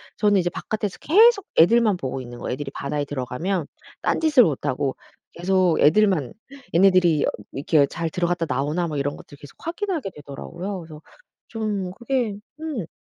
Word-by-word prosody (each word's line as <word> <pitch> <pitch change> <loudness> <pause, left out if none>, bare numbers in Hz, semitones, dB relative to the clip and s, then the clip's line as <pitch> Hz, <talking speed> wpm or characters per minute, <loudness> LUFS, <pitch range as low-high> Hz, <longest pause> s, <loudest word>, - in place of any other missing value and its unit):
저는 205 -2 +3
이제 175 0 0
바깥에서 210 +2 -4
계속 420 +5 +5
애들만 215 +3 +5
보고 135 -4 -4
있는 120 -1 -9
거예요. 120 - -4
애들이 135 +1 -5
바다에 145 +1 -3
들어가면 145 +6 -3 0.3
딴 - - 0
짓을 300 -6 +6
못하고 140 -2 -1 0.4
계속 180 -1 +2
애들만 170 - +3 0.4
얘네들이 175 -4 +4
어 - - +1 0.2
이렇게 145 +1 +2
잘 165 0 -3
들어갔다 175 0 -1
나오나 150 +7 0
뭐 150 - -4
이런 145 +1 -1
것들을 145 - -14
계속 145 - -13
확인하게 335 - -3
되더라고요. 170 +7 -7
그래서 160 -2 -11 0.5
좀 210 -5 -3
그게 235 +1 -1 0.3
음. 285 - -4
175 Hz, 375 characters per minute, -23 LUFS, 145-210 Hz, 0.5 s, 짓을